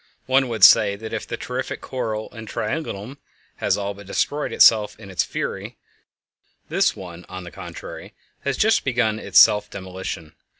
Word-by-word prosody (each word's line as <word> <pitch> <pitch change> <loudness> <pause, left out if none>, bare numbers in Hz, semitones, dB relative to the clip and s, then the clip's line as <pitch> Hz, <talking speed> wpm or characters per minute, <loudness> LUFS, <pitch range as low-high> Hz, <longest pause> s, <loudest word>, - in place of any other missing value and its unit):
One 130 0 +3
would 110 -4 -3
say 100 +1 +8
that 110 +2 -8
if 110 - -4
the 115 - -4
terrific 125 +2 -4
coil 110 -4 -4
in 110 -1 -10
Triangulum 125 +1 -4 0.4
has - - +1
all 100 0 -3
but 100 -1 -13
destroyed 145 +8 -1
itself 105 -2 +5
in 100 - -11
its 95 - +1
fury, - - -5 0.9
this - - +2
one 90 -2 -9
on 95 0 -7
the 85 - -10
contrary - - -9 0.2
has 140 -2 -2
just 220 +1 +3
begun 115 -4 0
its - - -1
self 105 0 +6
demolition. 95 -4 -7
110 Hz, 165 wpm, -22 LUFS, 100-125 Hz, 0.9 s, say